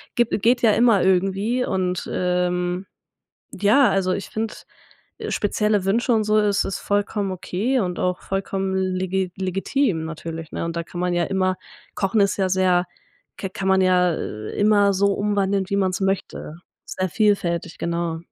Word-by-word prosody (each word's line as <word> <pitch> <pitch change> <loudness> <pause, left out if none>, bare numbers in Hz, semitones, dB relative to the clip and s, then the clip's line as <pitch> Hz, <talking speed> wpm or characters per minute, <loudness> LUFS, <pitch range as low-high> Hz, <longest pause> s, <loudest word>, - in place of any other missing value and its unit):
Gibt 240 -3 +1
geht 240 +3 +3
ja 225 - +5
immer 225 -3 +4
irgendwie 195 +6 +1
und, 180 -2 -2
ähm, 180 0 -1 0.7
ja, 215 +7 +4
also, 190 -2 +1
ich, 195 - -5
finde, 220 0 -3 0.6
äh, - - -6
spezielle 210 -1 0
Wünsche 235 +5 +2
und 220 -2 +2
so 215 0 +2
ist 205 -1 +2
ist 195 - -3
vollkommen 205 0 -1
okay 205 +8 -1
und 180 -4 -2
auch 180 0 -1
vollkommen 195 0 -2
legi 185 0 -1
legitim 190 - 0
natürlich, 165 0 -7
ne, - - -3
und 165 0 -5
da 170 - -1
kann 175 +1 -8
man 180 0 0
ja 175 -1 +1
immer 185 0 0 0.4
Kochen 195 +2 +1
ist 200 0 +2
ja 190 -2 0
sehr 180 -1 +3 0.5
k 195 - -3
kann 190 +1 -4
man 190 0 +4
ja 180 -2 +3 0.4
immer 205 -1 +3
so 200 +1 +2
umwandeln, 200 -1 0
wie 200 - +1
man's 190 -1 0
möchte. 190 -4 -2 0.3
Sehr 185 0 -3
vielfältig, 175 -4 0
genau. 170 -1 -2
190 Hz, 165 wpm, -22 LUFS, 180-205 Hz, 0.7 s, ja